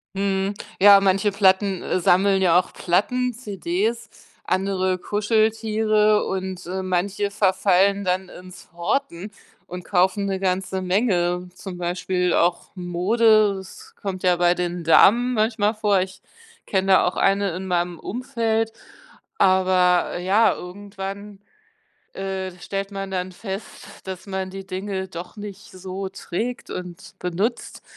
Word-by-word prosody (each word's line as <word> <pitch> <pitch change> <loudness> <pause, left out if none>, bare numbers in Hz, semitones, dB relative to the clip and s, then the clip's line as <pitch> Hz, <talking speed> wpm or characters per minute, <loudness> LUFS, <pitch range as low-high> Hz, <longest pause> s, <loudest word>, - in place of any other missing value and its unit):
Mhm, 195 0 -1 0.3
ja, 200 0 +9
manche 195 +2 +2
Platten, 190 -1 +2
äh, - - -1
sammeln 190 +2 +3
ja 175 -2 +4
auch 180 - 0
Platten, 250 +8 0
CDs, 215 +1 -3 0.3
andere 185 -1 0
Kuscheltiere 215 +1 +1
und, 190 -1 -4
äh, 185 +2 -3
manche 190 +2 -1
verfallen 195 0 +2
dann 185 0 -1
ins 180 0 -13
Horten 180 +2 -2 0.4
und 180 0 -8
kaufen 190 +2 +1
'ne 195 -1 -2
ganze 190 0 -1
Menge. 180 -2 0
Zum 185 -1 -8
Beispiel 180 +1 -1
auch 175 +1 +1
Mode, 205 +4 +3
das 190 0 -12
kommt 190 -2 -4
ja 180 -1 +4
bei 175 0 +3
den 175 -1 -3
Damen 235 +9 +5
manchmal 215 -1 +1
vor. 210 -2 +2
Ich 190 0 -7 0.4
kenne 190 -1 +2
da 185 - +5
auch 180 - -2
eine 195 -2 +1
in 190 +1 -5
meinem 175 -2 -1
Umfeld, 225 -1 -2 0.7
aber 185 -2 +3
ja, 195 +5 +3
irgendwann, 200 +2 -8 0.7
äh, 190 -1 -4
stellt 195 +2 -4
man 195 -1 -5
dann 185 -1 -3
fest, 195 +2 -8 0.2
dass 190 0 -7
man 190 -1 -3
die 195 0 -8
Dinge 190 0 -4
doch 175 +3 -9
nicht 205 0 -9
so 190 +1 -6
trägt 210 +5 -5
und 180 -1 -8
benutzt. 190 +7 -3
190 Hz, 135 wpm, -23 LUFS, 180-205 Hz, 0.7 s, ja